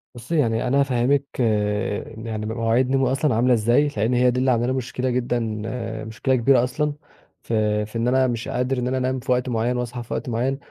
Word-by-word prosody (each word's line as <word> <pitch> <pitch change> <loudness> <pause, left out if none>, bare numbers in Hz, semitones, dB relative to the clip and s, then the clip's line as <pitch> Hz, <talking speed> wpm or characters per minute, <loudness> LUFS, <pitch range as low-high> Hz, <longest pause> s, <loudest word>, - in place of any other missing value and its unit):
بُصّي، 125 +8 -3
يعني 115 -3 +1
أنا 140 +3 +2
هافهّمِك 135 +1 +2 1.0
يعني 110 -1 -4
مواعيد 115 +3 +1
نومي 135 -1 +2
أصلًا 135 -2 +1
عاملة 125 +2 +3
إزاي، 120 +6 +3
لإن 110 +4 +1
هي 125 0 +4
دي 125 - -1
اللي 130 0 +2
عامله 120 0 +1
لي 130 - 0
مشكلة 130 0 -2
جدًا، 120 -1 0 0.7
مشكلة 130 +4 0
كبيرة 125 0 +4
أصلًا، 150 +4 -1 0.5
في 105 -2 0
في 110 +2 -7
إن 115 +2 0
أنا 130 +1 +3
مش 120 -1 -3
قادر 125 +1 -1
إن 125 - -1
أنا 130 +1 0
أنام 130 0 -1
في 130 +1 -3
وقت 125 0 +1
معيّن 120 +2 0
وأصحى 120 0 -4
في - - -7
وقت - - -3
معيّن. 125 +4 0
125 Hz, 205 wpm, -23 LUFS, 115-130 Hz, 1.0 s, هي